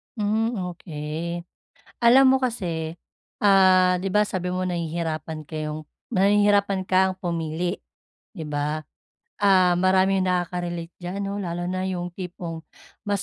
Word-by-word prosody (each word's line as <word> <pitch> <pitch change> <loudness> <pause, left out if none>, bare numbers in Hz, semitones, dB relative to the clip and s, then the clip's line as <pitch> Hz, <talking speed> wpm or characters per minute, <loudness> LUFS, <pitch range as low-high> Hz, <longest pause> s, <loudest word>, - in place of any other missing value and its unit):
Hmm, 220 +2 0 0.2
okey. 165 +1 -5 0.6
Alam 260 +2 +7
mo - - +3
kasi, 170 -9 -2 0.4
ah, 185 -2 +5
di 195 0 -2
ba 210 +1 +3
sabi 180 -1 -3
mo 185 0 -1
nahihirapan 160 -3 -3
kayong 155 -1 -5 0.2
nahihirapan 200 -1 +3
kang 185 0 +2
pumili, 170 0 -3 0.5
di 165 -6 -7
ba? 150 +1 -1 0.6
Ah, 185 -3 +4
maraming 190 +1 +3
nakakarelate 175 -1 -2
diyan, 180 +3 -5
'no, 200 +1 -3
lalo 175 -2 -3
na 185 0 -2
yung 180 -1 -3
tipong 175 -2 -6 0.5
mas 200 -2 0
180 Hz, 125 wpm, -24 LUFS, 170-195 Hz, 0.6 s, Alam